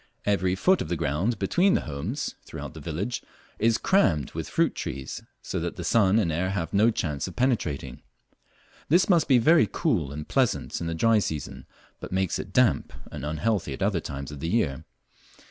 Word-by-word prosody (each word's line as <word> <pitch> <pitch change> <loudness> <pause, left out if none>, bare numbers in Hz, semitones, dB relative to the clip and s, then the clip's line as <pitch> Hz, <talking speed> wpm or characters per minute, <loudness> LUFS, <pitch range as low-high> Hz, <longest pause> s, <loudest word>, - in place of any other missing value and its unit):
Every 95 -2 +1
foot 185 - +3
of - - -3
ground 85 - 0
between 175 - +3
the - - +1
homes 80 - -4
throughout - - -8
the - - -9
village 90 +9 -3 0.4
is 115 +1 +3
crammed 80 - +2
with - - -5
fruit - - +2
trees, 65 0 -5 0.2
so - - -3
that - - -3
the - - -6
sun 105 -3 +3
and 95 -7 +2
air 90 +4 0
have 90 -4 -3
no 105 +3 +5
chance 75 -10 -2
of 90 - -9
penetrating. 115 - -1 0.9
This 175 +5 +4
must 175 -4 +4
be 130 - +6
very 160 +8 +5
cool 85 - 0
and 75 +1 -6
pleasant 130 -8 0
in 85 - -2
the 80 - -2
dry 115 +6 +4
season, 80 -7 -5 0.3
but - - -8
makes 95 -1 0
it 95 - -6
damp 125 +2 +2 0.2
and - - -7
unhealthy 80 +2 -1
at 65 - -4
other 100 -3 +1
times 70 -2 -6
of 75 - -8
the 80 - -3
year. 85 - 0
95 Hz, 190 wpm, -26 LUFS, 80-115 Hz, 0.9 s, be